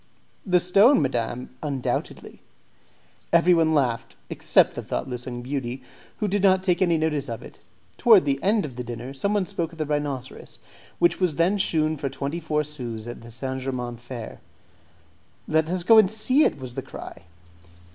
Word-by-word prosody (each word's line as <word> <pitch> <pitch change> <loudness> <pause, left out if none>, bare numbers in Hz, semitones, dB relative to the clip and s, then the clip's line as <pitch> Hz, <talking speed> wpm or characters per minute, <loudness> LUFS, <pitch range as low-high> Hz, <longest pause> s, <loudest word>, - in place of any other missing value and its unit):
"The 180 -1 +4
stone, 195 +9 +5
madam, 125 -3 -2
undoubtedly." 140 -4 -4 0.9
Everyone 165 -2 +4
laughed 120 -5 0 0.2
except - - +3
the - - -5
thoughtless 125 -1 -4
young 120 -1 -5
beauty, 130 -1 -4 0.3
who 210 - -1
did 200 0 0
not 190 -1 +4
take 180 -2 +1
any 170 -3 +3
notice 150 -4 -1
of 115 - -6
it. - - -13 0.4
Towards 220 -8 +6
the 140 -1 0
end 205 0 +2
of 130 -4 -9
the 125 - -3
dinner, 120 +2 -7
someone 200 +7 0
spoke 165 0 -4
of - - -13
the 155 - -2
rhinoceros, 145 -3 -4 0.4
which 345 - +2
was 180 -5 +1
then 180 +6 +2
shewn 155 -3 +1
for 140 -1 -3
twenty 140 +4 -4
four 150 -2 -1
sous 120 -7 -7
at 120 - -8
the 115 - -12
St. 130 +3 -5
Germain's 125 -2 -4
Fair. 120 -2 -8 1.1
"Let 160 0 +1
us 180 0 -1
go 225 +4 +7
and 200 -4 +5
see 255 +7 +3
it!" - - 0
was 130 -3 -8
the - - -4
cry. - - -10
150 Hz, 175 wpm, -24 LUFS, 125-180 Hz, 1.1 s, go